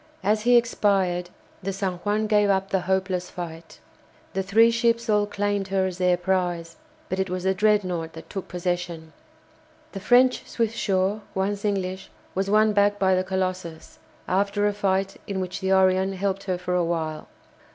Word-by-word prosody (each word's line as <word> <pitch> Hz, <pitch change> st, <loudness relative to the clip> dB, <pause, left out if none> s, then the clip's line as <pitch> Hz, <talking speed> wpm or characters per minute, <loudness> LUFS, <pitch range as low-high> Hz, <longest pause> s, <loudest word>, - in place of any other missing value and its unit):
As 210 Hz, +2 st, +2 dB
he 245 Hz, +2 st, +5 dB
expired 195 Hz, -6 st, +1 dB, 0.3 s
the 195 Hz, +1 st, -2 dB
"San 190 Hz, -2 st, -2 dB
Juan" 210 Hz, +4 st, -1 dB
gave 210 Hz, -1 st, +3 dB
up 195 Hz, 0 st, +1 dB
the 190 Hz, -, +2 dB
hopeless 185 Hz, -1 st, 0 dB
fight. 165 Hz, -2 st, -8 dB, 0.5 s
The 195 Hz, -, 0 dB
three 220 Hz, +4 st, +4 dB
ships 235 Hz, 0 st, +1 dB
all 210 Hz, -1 st, +2 dB
claimed 205 Hz, -1 st, -1 dB
her 190 Hz, -1 st, +1 dB
as 185 Hz, -1 st, -4 dB
their 180 Hz, -1 st, +3 dB
prize, 175 Hz, -2 st, -1 dB, 0.3 s
but 185 Hz, -, -3 dB
it 190 Hz, -1 st, 0 dB
was 180 Hz, 0 st, -3 dB
the 190 Hz, 0 st, +2 dB
"Dreadnought" 185 Hz, -5 st, +1 dB
that 160 Hz, -, -11 dB
took 195 Hz, -2 st, -6 dB
possession. 175 Hz, -2 st, -4 dB, 0.8 s
The 195 Hz, -, -6 dB
French 250 Hz, +5 st, +4 dB
"Swiftsure," 210 Hz, -3 st, 0 dB
once 200 Hz, +1 st, -1 dB
English, 190 Hz, -2 st, -2 dB, 0.2 s
was 195 Hz, +1 st, -1 dB
won 215 Hz, +1 st, +4 dB
back 205 Hz, 0 st, +3 dB
by 190 Hz, -1 st, +3 dB
the 185 Hz, 0 st, +2 dB
"Colossus," 185 Hz, -3 st, -4 dB, 0.3 s
after 200 Hz, +2 st, +1 dB
a 205 Hz, -, +2 dB
fight 195 Hz, -1 st, 0 dB
in 195 Hz, -2 st, -3 dB
which 185 Hz, -1 st, -4 dB
the 190 Hz, -1 st, -1 dB
"Orion" 190 Hz, 0 st, +3 dB
helped 195 Hz, +1 st, -2 dB
for 180 Hz, -1 st, -2 dB
a 180 Hz, -1 st, +2 dB
while. 160 Hz, -2 st, -3 dB
190 Hz, 170 wpm, -24 LUFS, 180-205 Hz, 0.8 s, he